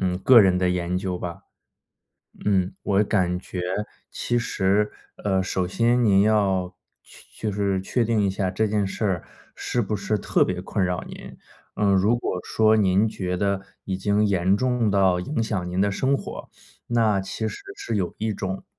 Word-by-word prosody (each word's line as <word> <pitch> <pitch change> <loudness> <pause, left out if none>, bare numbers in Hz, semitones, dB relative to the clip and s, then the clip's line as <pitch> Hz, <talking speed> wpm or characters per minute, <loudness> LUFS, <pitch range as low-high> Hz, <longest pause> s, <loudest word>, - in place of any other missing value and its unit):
嗯， 90 -1 0
个 120 +5 +7
人 95 -3 +4
的 90 0 +2
研 90 0 -1
究 90 -1 -3
吧。 85 -1 -6 1.0
嗯， 95 -2 +1
我 100 0 +2
感 90 -4 +1
觉 90 - -6 0.5
其 120 - -1
实， 105 -2 +1 0.3
呃， 95 -2 +2
首 95 -1 -1
先 120 +6 +2
您 100 -3 +5
要 95 -4 +1 0.3
确 110 - -9
就 - - -2
是 100 -1 0
确 115 +5 0
定 110 -2 +1
一 100 - +2
下 95 -1 -1
这 110 +4 0
件 105 -1 0
事 95 - -4
儿， 95 -4 0 0.3
是 120 - -1
不 105 0 -2
是 105 +2 -1
特 - - +2
别 90 -1 -3
困 95 +1 -1
扰 90 0 -2
您。 - - -10 0.4
呃， 100 -1 +2
如 100 +5 +3
果 90 -6 -3
说 110 0 +3
您 100 +1 +3
觉 90 -4 -3
得 100 0 0 0.2
已 95 - -2
经 100 +2 +1
严 95 -1 +2
重 125 -2 +1
到 95 -2 +3
影 115 +6 -2
响 95 -5 -2
您 90 +1 -2
的 100 +1 +2
生 130 +7 +1
活， - - -8 0.4
那 110 -4 +2
其 110 +3 -4
实 - - -7 0.2
是 115 - -3
有 90 -4 -2
一 110 0 -1
种 95 -1 -4
100 Hz, 200 characters per minute, -24 LUFS, 95-110 Hz, 1.0 s, 个